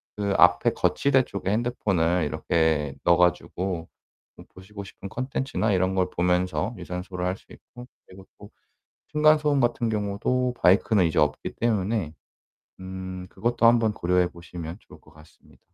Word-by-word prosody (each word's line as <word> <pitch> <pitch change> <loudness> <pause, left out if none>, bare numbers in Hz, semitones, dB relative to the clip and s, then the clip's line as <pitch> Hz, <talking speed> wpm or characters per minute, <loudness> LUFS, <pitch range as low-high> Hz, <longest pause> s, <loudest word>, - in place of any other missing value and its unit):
그 100 -1 -1
앞에 90 0 +5
거치대 135 -2 +2
쪽에 100 -3 -5
핸드폰을 95 -7 0
이렇게 75 -2 0
넣어 85 0 +4
가지고 90 0 0 0.5
음 - - -12
보시고 100 +2 -10
싶은 100 0 -10
콘텐츠나 130 -4 -2
이런 95 +1 +1
걸 90 -1 +1
보면서 90 +5 0
유산소를 90 +1 -5
할 90 +1 -1
수 - - -24
있고 125 0 -13 0.2
그리고 95 +1 -14
또 100 +1 -12 0.6
층간소음 150 -1 +3
같은 120 -1 0
경우도 110 +4 -1
바이크는 95 0 +4
이제 80 - -1
없기 75 0 0
때문에 105 -7 -1 0.7
음 95 0 -7
그것도 120 0 -1
한번 115 -2 +5
고려해 90 -1 +1
보시면 85 0 -9
좋을 - - -17
것 80 - -21
같습니다. 75 0 -20
95 Hz, 330 characters per minute, -25 LUFS, 90-115 Hz, 0.7 s, 앞에